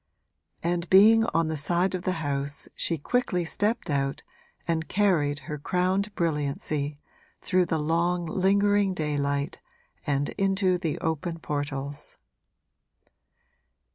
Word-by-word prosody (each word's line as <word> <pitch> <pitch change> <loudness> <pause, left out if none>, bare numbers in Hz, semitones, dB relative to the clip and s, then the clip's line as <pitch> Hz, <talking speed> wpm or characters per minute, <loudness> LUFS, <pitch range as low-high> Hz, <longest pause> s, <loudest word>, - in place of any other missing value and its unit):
And 170 0 -1
being 220 +4 +7
on 165 -7 +1
the 160 - -2
side 175 +5 +1
of 185 - -2
the 185 - -1
house 140 0 -2
she 165 - 0
quickly 180 - 0
stepped 210 +7 -1
out 140 -3 -1 0.4
and 160 -1 -1
carried 170 -8 +2
her 150 +2 -6
crowned 185 +6 0
brilliancy 150 -2 -1 0.4
through 185 -2 +1
the 160 - 0
long 170 +3 0
lingering 200 +2 +2
daylight 145 -2 -1 0.5
and 145 0 +1
into 190 -2 +2
the 165 -4 -2
open 160 +1 -2
portals. 145 -2 -4
165 Hz, 115 wpm, -27 LUFS, 145-185 Hz, 0.5 s, being